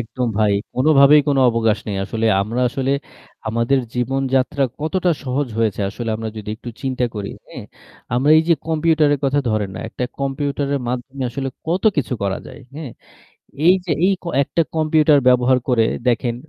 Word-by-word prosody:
একদম 125 +2 -3
ভাই, 105 -2 +3 0.2
কোনোভাবেই 140 +2 +6
কোনো 140 -1 +2
অবকাশ 115 -2 +1
নেই। 100 -2 -3
আসলে 110 +3 -2 0.2
আমরা 115 +5 -3
আসলে 135 +2 -2 0.6
আমাদের 115 +4 +1 0.2
জীবনযাত্রা 135 +2 0 0.2
কতটা 175 +3 0
সহজ 130 +1 -1
হয়েছে 110 -3 0
আসলে 115 +2 -5
আমরা 110 0 -5
যদি 105 -1 -7
একটু 120 - -8
চিন্তা 130 -2 -1
করি, 100 -2 -4 0.2
হ্যাঁ? - - -9 0.5
আমরা 135 +5 +2
এই - - +3
যে 170 - +6
কম্পিউটারের 155 -2 +2
কথা 140 +1 +2
ধরেন 105 -3 -1
না, - - -6
একটা 125 - -4
কম্পিউটারের 140 0 -2
মাধ্যমে 130 +2 -4
আসলে 135 +2 -3 0.2
কত 175 +3 -1
কিছু 135 -3 -1
করা 100 -1 -1
যায়, - - -11
হ্যাঁ? 150 -4 -7 0.8
এই 180 - +7
যে, 170 - -1
এই 195 - +3
ক - - -20 0.2
একটা 165 - 0
কম্পিউটার 155 -1 +4
ব্যবহার 125 0 +4
করে 120 -3 +3 0.2
দেখেন, 120 0 +1
130 Hz, 165 wpm, -20 LUFS, 115-145 Hz, 0.8 s, এই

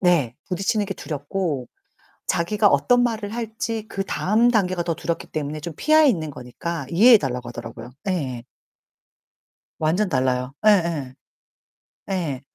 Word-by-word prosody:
네. 165 - +3
부딪히는 195 +3 0
게 195 - -3
두렵고 150 -3 -3 0.6
자기가 200 +4 +2
어떤 245 - +4
말을 220 -3 -1
할지 225 -1 -4
그다음 210 +4 +1
단계가 185 -5 +1
더 170 - 0
두렵기 170 +1 -3
때문에 150 0 -3
좀 170 +2 -6
피해 310 0 +5
있는 160 - 0
거니까 140 +4 -5
이해해 225 +8 +8
달라고 125 -4 -3
하더라고요. 120 0 -8 0.2
예예. 130 -10 -2 1.4
완전 180 +6 +1
달라요. 130 -1 0
예예. 165 -10 +3 0.9
예. 160 -9 -2
170 Hz, 285 characters per minute, -23 LUFS, 140-210 Hz, 1.4 s, 이해해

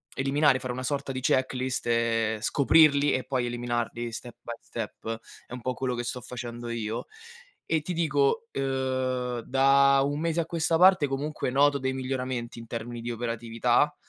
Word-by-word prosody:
eliminare, 135 0 +3
fare 125 -1 -4
una 130 +1 -5
sorta 140 0 -2
di 130 - -4
checklist 130 -1 0
e 115 -2 +1
scoprirli 145 +3 +4
e 130 - 0
poi 130 -2 -1
eliminarli 120 -1 -3
step 120 +1 -8
by - - -7
step, 115 0 -6 0.3
è - - -11
un 125 - -6
po' 130 - -1
quello 125 0 -2
che 120 - -3
sto 125 - -4
facendo 120 -1 -7
io. 115 -1 -3 0.6
E 160 -1 +1
ti 180 +4 -4
dico, 160 +6 +1
uhm, 130 -2 -1
da 135 +1 +4
un 145 +1 -1
mese 165 +1 0
a 160 - -2
questa 165 -1 0
parte 180 -3 +6
comunque 140 +2 -3
noto 140 +2 +4
dei 130 0 -1
miglioramenti 130 -2 -3
in 115 - -9
termini 115 +1 -5
di 120 +1 -5
operatività, 120 +4 0
130 Hz, 170 wpm, -27 LUFS, 120-140 Hz, 0.6 s, parte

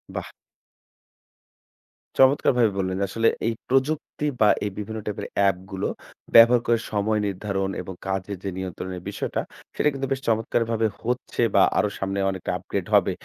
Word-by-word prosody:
বাহ! - - -5 1.9
চমৎকারভাবে 130 -4 +4
বললেন। 95 -1 -1
আসলে 115 +4 +1 0.2
এই 115 - +1
প্রযুক্তি 140 +3 0 0.2
বা 105 - +7 0.2
এই 105 - -2
বিভিন্ন 110 +1 -5
টাইপের 105 - -4
অ্যাপগুলো 95 -1 0 0.5
ব্যবহার 115 +1 +8
করে 115 -1 +3
সময় 105 +1 +1
নির্ধারণ 95 0 -2
এবং 95 +1 -7
কাজের 95 +1 -3
যে 100 - -2
নিয়ন্ত্রণের 95 -1 -5
বিষয়টা 100 - -2 0.3
সেটা 150 - +3
কিন্তু 135 0 -3
বেশ 135 -1 0
চমৎকারভাবে 115 0 +1 0.2
হচ্ছে 125 +1 -2
বা - - +7 0.2
আরো 105 - +2
সামনে 95 +1 -2
অনেকটা 95 -2 -3
আপগ্রেড - - -4
হবে। - - +4
105 Hz, 140 wpm, -24 LUFS, 95-115 Hz, 1.9 s, ব্যবহার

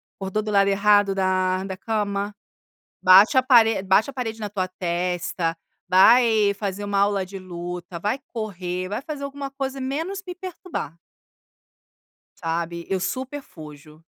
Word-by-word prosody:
acordou 195 +2 -3
do 215 - -4
lado 200 -1 +4
errado 200 0 +3
da 185 -1 +1
da 190 -1 -5
cama 205 0 -2 0.7
bate 195 +8 +7
a 260 - +5
parede 225 -5 +5
bate 195 +6 +3
a - - -7
parede 225 -4 -4
na 210 - -3
tua 190 -2 -2
testa, 175 -2 -2 0.3
vai 215 +2 +5
fazer 200 0 -4
uma 200 -1 0
aula 200 -1 +2
de 195 +1 -8
luta, 175 -1 -7
vai 210 +9 -2
correr, 185 -5 -4
vai 210 +5 -3
fazer 290 -1 -6
alguma 280 0 -5
coisa, 270 0 -4
menos 320 +9 -3
me 360 - -5
perturbar." 360 - -6 1.4
Sabe, 170 +1 -3
eu 190 -1 0
super 260 +9 -4
fujo. 155 - -13
200 Hz, 150 wpm, -23 LUFS, 185-235 Hz, 1.4 s, bate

